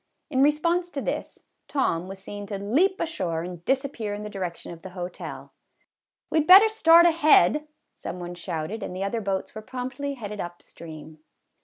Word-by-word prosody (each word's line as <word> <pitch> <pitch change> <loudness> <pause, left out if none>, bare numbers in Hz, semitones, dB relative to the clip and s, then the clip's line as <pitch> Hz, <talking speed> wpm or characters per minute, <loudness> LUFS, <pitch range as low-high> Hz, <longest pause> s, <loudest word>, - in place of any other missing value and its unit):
In 265 -2 +2
response 335 +5 +2
to 295 - -5
this, - - -4 0.2
Tom 180 - 0
was 195 +1 -7
seen 205 +1 -8
to 200 -1 -4
leap 295 - +1
ashore 175 - -2
and 175 -1 -8
disappear 265 -6 -1
in 210 - -7
the 210 - -6
direction 180 -4 -5
of 165 -1 -10
the 190 - -8
hotel. 180 0 -7 0.4
" - - -65
We 320 - +3
'd 305 - 0
better 395 +4 +9
start 340 -6 +6
ahead," 305 - +4 0.3
some 180 - -7
one 175 0 -6
shouted, 175 +4 -4
and 180 - -5
the 190 - -3
other 225 +3 -2
boats 195 -2 -3
were 215 - -7
promptly 260 +4 -5
headed 210 -4 -7
up 175 0 -6
stream. 155 -1 -11
210 Hz, 185 wpm, -25 LUFS, 180-295 Hz, 0.4 s, better